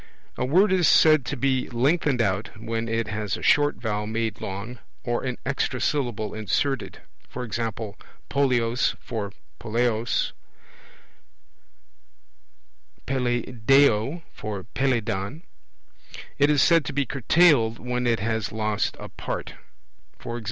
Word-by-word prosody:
A - - -2
word 185 +9 +4
is 180 -3 +4
said 155 -4 +6
to 145 - -3
be 130 0 0
lengthened 130 +1 +2
out, 100 +1 -2
when 115 +1 -3
it 115 0 -1
has 105 -1 -2
a - - -9
short 145 0 +4
vowel 105 -2 -3
made 110 0 -2
long, 100 +6 -6 0.2
or 120 0 -1
an 125 -2 -3
extra 130 -1 -1
syllable 120 -8 -1
inserted; 130 +5 -2 0.4
e. 125 - -3
g. 115 +2 -3 0.7
polleos 125 -3 +1
for 105 -5 -5 0.3
poleos, 115 0 0 2.7
Peleiadeo 125 +2 +2
for 105 -3 -5
Peleidon. 120 - -1 1.0
It 145 +1 +5
is 145 -2 +4
said 165 -2 +5
to 145 - -4
be 140 0 +1
curtailed, 135 -3 +3
when 125 0 -2
it 115 -3 +1
has 110 -2 -1
lost 110 -1 -1
a - - -7
part; - - -5 0.7
e.g. 120 0 -4
120 Hz, 125 wpm, -25 LUFS, 110-135 Hz, 2.7 s, said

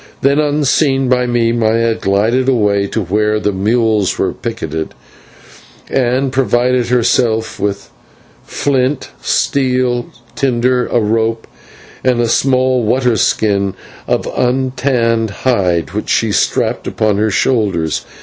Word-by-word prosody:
Then, 140 +2 +2
unseen 145 -2 +1
by 125 -1 +2
me, 120 -1 +1
Maya 115 0 +1
glided 110 +6 +1
away 105 -5 +1
to 110 +1 -2
where 105 +4 0
the 105 - 0
mules 110 0 +1
were 95 - -1
picketed 80 -10 -5 1.0
and 130 +1 +1
provided 125 -1 +1
herself 115 -2 +1
with 100 0 -3 0.5
flint, 135 0 -1
steel, 125 -3 0 0.3
tinder, 125 -1 +1
a 120 - +1
rope, 115 +1 0 0.6
and 125 -2 +2
a 120 - +2
small 130 +1 +2
water 125 +2 +1
skin 100 -3 0 0.3
of - - 0
untanned 125 -3 0
hind, 90 - 0
which 105 +2 -4
she 110 -2 +1
strapped - - 0
upon 105 -2 0
her 110 +1 +1
shoulders. 100 - 0
115 Hz, 120 wpm, -15 LUFS, 105-130 Hz, 1.0 s, Then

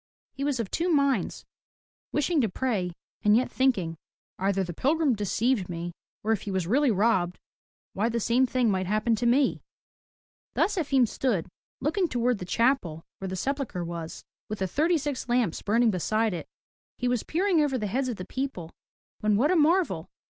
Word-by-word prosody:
He 275 - -5
was 280 -3 0
of 220 -5 -3
two 345 +2 0
minds, 280 -4 +1 0.7
wishing 295 +1 +2
to 225 - +1
pray 190 -5 -1 0.3
and 210 +1 +5
yet 255 - 0
thinking, 195 -12 +1 0.4
"Either 195 0 +1
the 175 -1 -5
pilgrim 290 - +2
deceived 210 0 0
me, 170 0 -4 0.3
or 220 - +1
if 220 - +1
he - - -6
was 190 -3 -1
really 265 - +3
robbed, 190 -4 +2 0.6
why 215 +4 +1
the 235 0 -1
same 245 +4 +3
thing 245 -3 +2
might 185 -1 -1
happen 215 +3 +2
to 240 +2 0
me.'' 265 +3 +3 0.9
Thus 415 - +2
Efim 275 -8 +2
stood, 215 -8 -1 0.3
looking 340 +6 +1
toward 245 -5 0
the 180 - -5
chapel 190 - +1
where 195 - -4
the 190 - -3
sepul 275 +7 -1
chre 175 -1 -4
was, 170 -1 -6 0.3
with 215 - -3
the 190 - -1
thirty 320 - +2
six 285 -4 -4
lamps 240 -8 +1
burning 225 +2 +3
beside 215 +3 0
it. 170 - -5 0.5
He 250 - -1
was 245 -2 +1
peering 355 0 +1
over 280 -3 +1
the 215 - -2
heads 255 +6 -1
of 245 - -2
the 185 - -7
people, 195 -9 -4 0.5
when 210 -1 +2
what 290 - +3
a - - +3
marvel! 315 - +2
235 Hz, 185 wpm, -27 LUFS, 190-275 Hz, 0.9 s, and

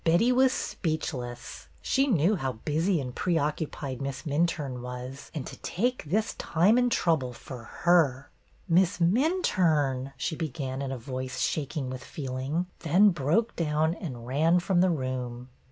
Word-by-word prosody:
Betty 175 +9 +4
was 260 +1 +5
speechless. 125 - -4 0.2
She 270 +1 +2
knew 195 - +3
how 135 -7 -2
busy 160 - 0
and 125 -3 -5
preoccupied 150 -5 -2
Miss 135 0 -4
Minturne 145 -4 -1
was, 125 +2 -7
and 145 - -3
to - - -8
take 245 +4 -1
this 215 +9 0
time 190 +9 +3
and 245 -1 +2
trouble 155 - +1
for 120 -1 -9 0.2
her! 150 -6 +3 0.2
'' - - -34
Miss 180 +2 +3
Minturne," 170 - +2
she 160 - -2
began 135 -4 -4
in 135 -1 -3
a 135 - -3
voice 130 +2 -5
shak 150 +1 -1
ing 130 -3 -2
with 130 -1 -6
feeling; 135 +4 -3
then 180 +6 +5
she - - 0
broke 170 - +1
down 155 0 +1
and 130 - -7
ran 160 +7 +3
from 175 0 +2
the 185 - +4
room. 130 -4 -3
150 Hz, 160 wpm, -28 LUFS, 130-175 Hz, 0.2 s, was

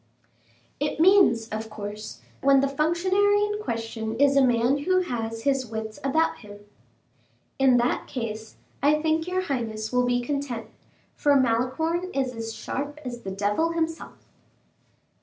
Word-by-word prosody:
"It 295 +1 -2
means, 345 - +5
of 220 +1 -5
course, 210 0 -7 0.2
when 275 0 +5
the 275 - +2
functionary 370 +8 +2
in 415 0 -2
question 225 - -4
is 280 0 +4
a 275 - +6
man 245 +2 +3
who 370 +5 +2
has 225 -8 -4
his 270 -2 +1
wits 220 -1 -6
about 315 +4 +1
him." 205 -1 -13 0.9
"In 265 -2 +5
that 240 +1 0
case 220 -3 -5 0.3
I 295 +2 +4
think 320 +1 0
your 370 +1 0
highness 225 -7 -3
will 250 0 +2
be 245 0 +2
content, 260 -3 -4 0.4
for 290 -2 +2
Malicorne 260 +9 0
is 265 -2 0
as 225 -1 -5
sharp 290 +2 -5
as 240 -1 -6
the 195 - -6
devil 205 +12 0
himself." 325 -1 -4
260 Hz, 145 wpm, -25 LUFS, 225-315 Hz, 0.9 s, a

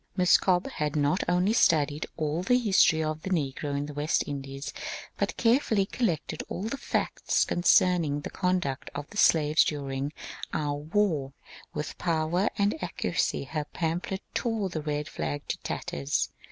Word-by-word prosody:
Miss 180 0 +6
Cobbe 185 +7 +2
had 150 - -2
not 150 +5 +2
only 180 +4 +3
studied 155 -8 +3
all 155 +1 -1
the 250 +7 +3
history 190 -8 +4
of 155 0 -3
the 190 - -5
negro 145 -4 -1
in 145 - -2
the 150 - -7
West 145 +3 +1
Indies, 135 0 -5 0.4
but - - -2
carefully 230 -4 +3
collected 190 -7 -2
all 185 - -4
the 225 +5 -2
facts - - 0
concerning 175 -4 +3
the - - -6
conduct 180 -8 -1
of 145 0 -5
the 205 - -8
slaves 155 -4 +5
during 140 -1 -3 0.4
our 145 -2 0
war; 150 -2 0 0.4
with 150 - -4
power 170 +3 +1
and 200 -4 +1
accuracy 170 -3 -1
her 150 +2 -3
pamphlet 175 +3 -2
tore 225 -5 -1
the 160 -3 -3
red 150 0 -2
flag 145 -1 -4
to - - -2
tatters. 70 0 -2
160 Hz, 155 wpm, -28 LUFS, 145-185 Hz, 0.4 s, Miss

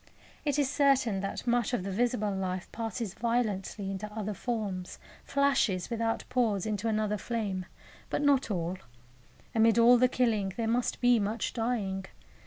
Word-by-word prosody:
It 290 -1 +1
is 285 -2 +3
certain 270 -7 +2
that 195 +4 -4
much 240 -1 +1
of 185 - -3
the 195 - -3
visible 220 0 0
life 185 -1 -3
passes 225 -3 -4
violently 210 -4 -1
into 205 +2 -5
other 210 -1 -3
forms, 200 -5 -3 0.3
flashes 270 -9 +1
without 225 0 -1
pause 230 -7 +1
into 215 +1 -2
another 215 -1 0
flame; 200 -5 -3 0.4
but - - -1
not 280 -4 +3
all. 180 -1 -2 0.7
Amid 225 0 +4
all 240 +1 +7
the 255 - +6
killing 220 -7 +1
there 230 -1 -1
must 240 +2 0
be 245 -2 +5
much 215 +2 -2
dying. 215 -5 -1
220 Hz, 155 wpm, -30 LUFS, 195-245 Hz, 0.7 s, all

